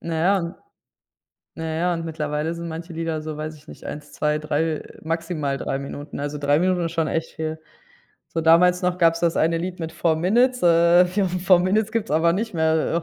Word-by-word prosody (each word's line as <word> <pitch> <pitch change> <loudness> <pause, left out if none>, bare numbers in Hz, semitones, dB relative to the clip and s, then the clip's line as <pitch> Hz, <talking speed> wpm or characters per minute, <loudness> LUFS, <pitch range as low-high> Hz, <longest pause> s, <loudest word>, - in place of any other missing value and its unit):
Na 165 -1 -4
ja, 175 +1 +1 1.0
na 160 - -6
ja, 175 +1 +1
und 165 0 -4
mittlerweile 155 0 -2
sind 170 0 -6
manche 165 +2 -7
Lieder 165 -1 -3
so, 155 -1 -5
weiß 155 +1 -5
ich 150 - -20
nicht, - - -12
1, 150 0 -8
2, 150 0 0
3 155 +1 -1 0.2
maximal 165 -3 -2
3 135 - -2
Minuten, 140 +1 -7
also 145 +1 -3
3 145 0 +2
Minuten 180 -1 +1
ist 165 - -5
schon 165 -2 0
echt 165 0 -2
viel. 160 0 -4 0.7
So 165 - -2
damals 175 +3 +5
noch 180 0 0
gab's 165 -1 +3
das 170 -1 +2
eine 165 +1 +2
Lied 180 +1 -4
mit 165 0 -4
4 160 0 +1
Minutes 240 +9 +2
äh, 170 +1 +6
fo 190 +3 0
four 180 0 +3
Minutes 205 +4 +1
gibt's 225 -1 -2
aber 165 +2 +3
nicht 220 +3 -2
mehr, 160 0 +1
165 Hz, 205 wpm, -23 LUFS, 155-180 Hz, 1.0 s, äh